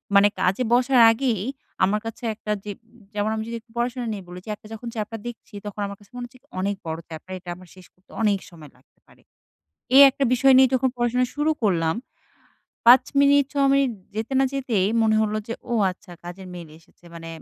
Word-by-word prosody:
মানে 200 Hz, +1 st, +7 dB
কাজে 190 Hz, +7 st, +1 dB
বসার 250 Hz, +1 st, +4 dB
আগেই, 225 Hz, -4 st, -1 dB, 0.4 s
আমার 205 Hz, +3 st, +2 dB
কাছে 225 Hz, +2 st, -7 dB
একটা 210 Hz, 0 st, -5 dB
যে 210 Hz, -, -4 dB, 0.4 s
যেমন 205 Hz, +1 st, -1 dB
আমি 220 Hz, -, -3 dB
যদি 235 Hz, -, -4 dB, 0.2 s
পড়াশোনা 240 Hz, +1 st, -2 dB
নিয়ে 200 Hz, -2 st, -7 dB
বলেছি 180 Hz, +2 st, -11 dB, 0.3 s
যখন 230 Hz, +2 st, -8 dB
চ্যাপটার 220 Hz, +1 st, -4 dB
দেখছি 235 Hz, -1 st, -10 dB
তখন 205 Hz, 0 st, -6 dB
আমার 200 Hz, -, -8 dB
কাছে 205 Hz, -, -22 dB
মনে 245 Hz, 0 st, -5 dB
হচ্ছে 255 Hz, +1 st, -20 dB, 0.2 s
"অনেক 200 Hz, +2 st, -1 dB
বড় 160 Hz, 0 st, -4 dB
চ্যাপটা 160 Hz, +3 st, -10 dB
এটা 175 Hz, 0 st, -11 dB
আমার 180 Hz, 0 st, -15 dB
শেষ 185 Hz, -1 st, -15 dB
করতে 185 Hz, -, -38 dB
অনেক 205 Hz, -3 st, +2 dB
সময় 155 Hz, -5 st, -14 dB
লাগতে 130 Hz, -, -32 dB
পারে।" -, -, -23 dB, 0.7 s
এই 275 Hz, -, +10 dB
একটা 275 Hz, +1 st, -2 dB
বিষয় 265 Hz, +2 st, +5 dB
নিয়ে 260 Hz, -1 st, +6 dB
যখন 260 Hz, 0 st, +2 dB
পড়াশোনা 240 Hz, +1 st, +1 dB
শুরু 300 Hz, +2 st, +1 dB
করলাম। 165 Hz, -6 st, +1 dB, 0.9 s
৫ 255 Hz, +1 st, +8 dB, 0.2 s
মিনিট 280 Hz, 0 st, +5 dB
৬ 280 Hz, -1 st, +2 dB
মিনিট 275 Hz, -2 st, +3 dB, 0.3 s
যেতে 225 Hz, +4 st, -3 dB
না 270 Hz, -, +4 dB
যেতেই, 235 Hz, -8 st, 0 dB, 0.2 s
মনে 220 Hz, -1 st, +3 dB
হল 215 Hz, -1 st, -1 dB
যে 230 Hz, -, -2 dB, 0.2 s
ও -, -, -1 dB, 0.2 s
আচ্ছা 180 Hz, -1 st, -13 dB
কাজের 185 Hz, +2 st, -9 dB
মেইল 170 Hz, -3 st, -9 dB
এসেছে। 165 Hz, +1 st, -27 dB
মানে 165 Hz, 0 st, -9 dB
220 Hz, 195 wpm, -23 LUFS, 185-250 Hz, 0.9 s, এই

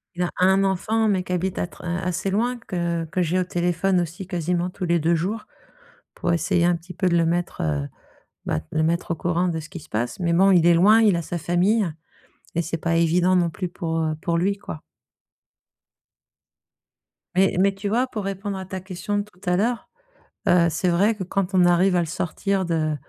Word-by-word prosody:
Il 180 Hz, -, -1 dB
a 175 Hz, -, 0 dB
1 190 Hz, +2 st, +4 dB
enfant 215 Hz, +4 st, +1 dB
mais 190 Hz, -3 st, +1 dB
qui 185 Hz, -, -8 dB
habite 180 Hz, +1 st, -1 dB
à -, -, -1 dB
tr -, -, -15 dB
a 175 Hz, 0 st, -2 dB
assez 180 Hz, +2 st, -2 dB
loin, 240 Hz, +5 st, 0 dB
que 170 Hz, -6 st, -2 dB
que 180 Hz, +3 st, -2 dB
j'ai 175 Hz, +2 st, +1 dB
au 185 Hz, -, 0 dB
téléphone 175 Hz, +1 st, +1 dB
aussi 175 Hz, +2 st, -6 dB
quasiment 175 Hz, 0 st, -1 dB
tous 180 Hz, -, -8 dB
les 170 Hz, 0 st, +2 dB
2 165 Hz, +2 st, +2 dB
jours 195 Hz, +7 st, -3 dB, 0.7 s
pour 175 Hz, -, -1 dB
essayer 170 Hz, +2 st, +1 dB
un 175 Hz, 0 st, +3 dB
petit 170 Hz, +2 st, -10 dB
peu 180 Hz, +2 st, 0 dB
de 170 Hz, -, +3 dB
le 165 Hz, -, +3 dB
mettre, 175 Hz, +1 st, -1 dB
heu, 75 Hz, -2 st, -1 dB, 0.6 s
bah, -, -, 0 dB
de -, -, -3 dB
le 155 Hz, -, +3 dB
mettre 170 Hz, +1 st, 0 dB
au -, -, 0 dB
courant 175 Hz, +2 st, 0 dB
de 165 Hz, -2 st, -1 dB
ce 155 Hz, -, -10 dB
qui 180 Hz, -, -8 dB
se 160 Hz, -, -16 dB
passe. 120 Hz, -, -2 dB
Mais 170 Hz, -1 st, +1 dB
bon, 190 Hz, +3 st, +5 dB
il 175 Hz, -3 st, +5 dB
est 175 Hz, -, +6 dB
loin, 210 Hz, +6 st, +6 dB
il 210 Hz, -5 st, +4 dB
a 170 Hz, -, -1 dB
sa 175 Hz, +2 st, -4 dB
famille 180 Hz, +5 st, +2 dB, 0.7 s
et 170 Hz, -, +2 dB
c'est 165 Hz, 0 st, -3 dB
pas 165 Hz, +1 st, -1 dB
évident 175 Hz, +2 st, +3 dB
non 170 Hz, -1 st, +2 dB
plus 180 Hz, +1 st, -4 dB
pour, 165 Hz, -1 st, -3 dB
heu, 155 Hz, -1 st, 0 dB
pour 170 Hz, -1 st, 0 dB
lui, 200 Hz, +3 st, +1 dB
quoi. 160 Hz, -6 st, -8 dB, 2.5 s
Mais 190 Hz, 0 st, +3 dB
mais 195 Hz, +1 st, +3 dB
tu 195 Hz, +1 st, -5 dB
vois 245 Hz, +5 st, +1 dB
pour 210 Hz, -5 st, -5 dB
répondre 195 Hz, 0 st, -4 dB
à 190 Hz, -, -6 dB
ta 190 Hz, 0 st, -6 dB
question 190 Hz, +2 st, -4 dB
de -, -, -1 dB
tout 205 Hz, -3 st, -22 dB
à 180 Hz, -, +2 dB
l'heure, 230 Hz, +5 st, 0 dB, 0.6 s
heu, 175 Hz, -1 st, +5 dB
c'est 180 Hz, +3 st, 0 dB
vrai 195 Hz, +6 st, +3 dB
que 195 Hz, -, -5 dB
quand 195 Hz, +1 st, -2 dB
on 180 Hz, -1 st, +5 dB
arrive 180 Hz, +2 st, +4 dB
à -, -, +3 dB
le 170 Hz, -, +1 dB
sortir 190 Hz, +4 st, -1 dB
de 155 Hz, -3 st, 0 dB
180 Hz, 225 wpm, -23 LUFS, 170-195 Hz, 2.5 s, est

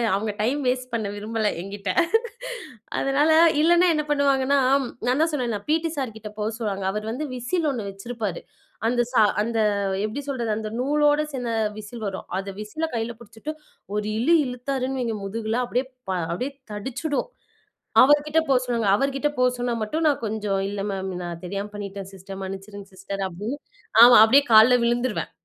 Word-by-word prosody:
அவங்க 210 Hz, +2 st, -1 dB
time 255 Hz, +7 st, +1 dB
waste 250 Hz, 0 st, -1 dB
பண்ண 220 Hz, -3 st, -1 dB
விரும்பல 215 Hz, +1 st, -2 dB
என்கிட்ட. 200 Hz, 0 st, -4 dB, 1.1 s
அதனால 285 Hz, +3 st, +2 dB, 0.3 s
இல்லன்னா 345 Hz, +2 st, +5 dB
என்ன 300 Hz, -, 0 dB
பண்ணுவாங்கன்னா 280 Hz, -1 st, +3 dB, 0.5 s
நான் 260 Hz, +5 st, +2 dB
தான் 325 Hz, 0 st, +2 dB
சொன்னேன்ல 240 Hz, -7 st, -1 dB
பீட்டி 325 Hz, +1 st, +2 dB
சார் 255 Hz, -5 st, -2 dB
கிட்ட 215 Hz, -1 st, -8 dB
போ 210 Hz, -, -2 dB
சொல்லுவாங்க. 200 Hz, -4 st, -3 dB
அவர் 210 Hz, +2 st, -4 dB
வந்து 290 Hz, +6 st, -3 dB
விசில் 310 Hz, +7 st, -1 dB
ஒண்ணு 220 Hz, -6 st, -4 dB
வச்சிருப்பாரு. 200 Hz, -2 st, -5 dB, 0.5 s
அந்த 240 Hz, +1 st, +2 dB
சா 245 Hz, -, +4 dB, 0.2 s
அந்த 230 Hz, 0 st, -1 dB, 0.5 s
எப்படி 225 Hz, +7 st, -4 dB
சொல்றது? 240 Hz, -5 st, -2 dB
அந்த 215 Hz, -1 st, -4 dB
நூலோட 295 Hz, +3 st, +3 dB
சேர்ந்த 245 Hz, -3 st, -3 dB, 0.2 s
விசில் 215 Hz, +1 st, -7 dB
வரும். 190 Hz, -1 st, -5 dB
அத 195 Hz, +1 st, -5 dB
விசில 310 Hz, +10 st, -3 dB
கைல 225 Hz, +1 st, -2 dB
புடிச்சுட்டு, 230 Hz, +6 st, -8 dB, 0.4 s
ஒரு 210 Hz, 0 st, -1 dB
இழு 315 Hz, +8 st, +3 dB
இழுத்தாருன்னு 260 Hz, +1 st, -3 dB
வைங்க 230 Hz, -2 st, -1 dB
முதுகுல, 220 Hz, +3 st, -2 dB
அப்படியே 250 Hz, +2 st, -1 dB, 0.2 s
ப -, -, +1 dB, 0.2 s
அப்படியே 250 Hz, +11 st, -2 dB, 0.2 s
தடிச்சிடும். 265 Hz, +7 st, -3 dB, 0.8 s
அவர் 290 Hz, +2 st, +5 dB
கிட்ட 310 Hz, +2 st, +3 dB
போ 275 Hz, -, +3 dB
சொல்லுவாங்க. 235 Hz, -4 st, 0 dB
அவர் 275 Hz, +3 st, 0 dB
கிட்ட 295 Hz, +2 st, +1 dB
போ 250 Hz, -, +3 dB
சொன்னா 245 Hz, -1 st, -1 dB
மட்டும் 315 Hz, +9 st, -1 dB
நான் 280 Hz, -5 st, +1 dB
கொஞ்சம், 210 Hz, -2 st, -1 dB
"இல்ல 200 Hz, -1 st, -4 dB
மேம். 190 Hz, -1 st, -3 dB
நான் 170 Hz, -1 st, -6 dB
தெரியாம 200 Hz, +3 st, -4 dB
பண்ணிட்டேன் 200 Hz, -1 st, -6 dB
சிஸ்டர், 195 Hz, +1 st, -9 dB
மன்னிச்சிருங்க 195 Hz, +1 st, -7 dB
சிஸ்டர்" 195 Hz, +1 st, -6 dB
அப்படின்னு. 210 Hz, +10 st, -5 dB, 0.4 s
ஆமா. 245 Hz, +1 st, +10 dB
அப்படியே 275 Hz, +6 st, +6 dB
கால்ல 220 Hz, +3 st, +8 dB
விழுந்துருவேன். 240 Hz, -1 st, 0 dB
235 Hz, 165 wpm, -24 LUFS, 205-270 Hz, 1.1 s, ஆமா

